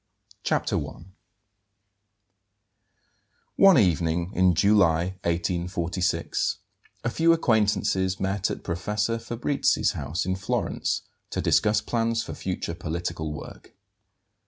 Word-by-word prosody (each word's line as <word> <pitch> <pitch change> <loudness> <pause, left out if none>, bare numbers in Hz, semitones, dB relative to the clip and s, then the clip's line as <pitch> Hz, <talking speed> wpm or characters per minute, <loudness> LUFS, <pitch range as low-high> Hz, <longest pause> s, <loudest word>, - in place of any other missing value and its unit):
CHAPTER - - 0
I. - - -6 2.5
ONE 195 -3 +7
evening 85 - +1
in 90 -3 +3
July, 90 -2 +3
1846, 90 +1 -1 0.5
a 120 - 0
few 165 +6 +3
acquaintances 105 - +1
met 95 0 0
at - - -5
Professor 105 +6 -1
Fabrizi's 120 +5 0
house 85 - -3
in 95 0 0
Florence 95 - -2 0.3
to - - -3
discuss 105 0 +3
plans 115 0 0
for - - -7
future 90 -2 -4
political 85 -1 -4
work. 75 - -10
95 Hz, 100 wpm, -26 LUFS, 85-110 Hz, 2.5 s, ONE